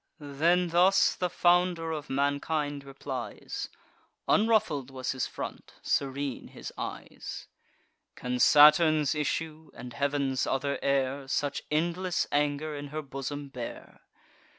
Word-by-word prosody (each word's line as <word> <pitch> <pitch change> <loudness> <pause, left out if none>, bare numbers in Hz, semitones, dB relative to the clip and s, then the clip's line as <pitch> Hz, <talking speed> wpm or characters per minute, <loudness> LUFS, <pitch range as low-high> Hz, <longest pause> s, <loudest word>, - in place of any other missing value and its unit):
Then 165 +5 +1
thus 185 +3 +4
the 180 - -2
founder 175 -1 +2
of 150 -2 -5
mankind 145 +1 -1
replies 135 -1 -6 0.6
(Unruffled 215 - +2
was 130 -1 -3
his 130 -2 -2
front, - - -7
serene 140 -1 -1
his - - -9
eyes) - - -7 0.7
"Can 125 0 -3
Saturn's 150 0 +6
issue, 155 +1 -3
and 125 -1 -9
heav'n's 140 -2 0
other 140 +1 -1
heir, 135 0 0
Such 140 +1 -1
endless 175 +3 0
anger 145 +1 0
in 145 0 -6
her 155 +2 -5
bosom 140 +1 -5
bear? 125 -4 -8
145 Hz, 115 wpm, -29 LUFS, 140-160 Hz, 0.7 s, Saturn's